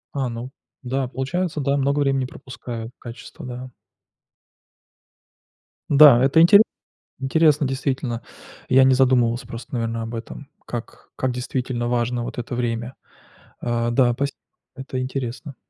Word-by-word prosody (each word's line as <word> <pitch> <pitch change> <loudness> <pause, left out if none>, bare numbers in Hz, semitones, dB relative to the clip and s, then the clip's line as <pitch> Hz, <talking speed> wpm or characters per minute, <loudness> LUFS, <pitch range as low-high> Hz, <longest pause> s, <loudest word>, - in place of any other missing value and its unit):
А, 135 -3 -1
ну 120 +2 -6 0.3
да, 130 +1 -1
получается, 155 +6 -2
да, 140 0 +1
много 140 +1 +1
времени 135 -2 +1
пропускаю. 120 -2 -8
Качество, 120 +1 -10
да. 125 0 -7 2.2
Да, 140 -4 +8
это 150 +4 +5
интере 200 +5 +8 0.6
интересно 150 +1 +3
действительно. 130 -3 -2 0.4
Я 130 +1 +6
не 130 0 +5
задумывался, 125 -2 +2
просто, 115 +3 -9
наверное, 115 -1 -2
об 115 +1 -5
этом, 110 - -8 0.2
как - - -8
как 130 -1 -1
действительно 125 -1 -3
важно 120 0 0
вот - - -6
это 120 0 -4
время. 120 0 -2 0.7
Э, 120 -1 0
да, 120 0 +3
пост- 140 +3 -2 0.4
это 130 -1 -5
интересно. 130 +2 -5
130 Hz, 130 wpm, -22 LUFS, 120-135 Hz, 2.2 s, Да